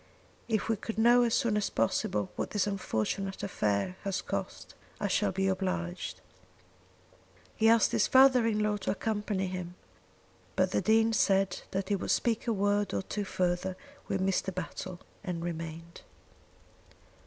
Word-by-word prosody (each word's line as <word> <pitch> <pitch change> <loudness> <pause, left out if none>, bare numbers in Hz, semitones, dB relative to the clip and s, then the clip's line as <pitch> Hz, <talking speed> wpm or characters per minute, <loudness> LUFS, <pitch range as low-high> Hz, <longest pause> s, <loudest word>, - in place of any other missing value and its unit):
If 220 -3 0
we 225 -1 +1
could 225 +2 -6
know 240 +2 +6
as 235 -2 +2
soon 230 -3 +1
as 210 - 0
possible 105 -2 0
what - - -3
this 205 -3 0
unfortunate 195 - -2
affair 105 - -1
has 195 -2 -2
cost, - - -5 0.3
I 205 - 0
shall 200 0 +1
be 190 +1 0
obliged." 185 -2 -2 1.3
He 225 0 +4
asked 230 -1 +5
his - - +2
father 260 -3 +6
in 215 -1 +1
law 210 0 +1
to 205 - -4
accompany 205 -2 -1
him, 180 -1 -5 0.8
but - - +2
the - - +1
Dean 225 +1 +3
said 195 -3 +2
that 190 0 -3
he 205 - +3
would 195 - -4
speak 235 0 +1
a - - +2
word 205 -1 +1
or - - -1
two 205 +1 -3
further 185 0 -1 0.3
to 195 - +1
Mr. 190 0 0
Battle 185 0 -6 0.2
and 175 -4 -4
remained. 165 0 -6
195 Hz, 155 wpm, -30 LUFS, 180-215 Hz, 1.3 s, know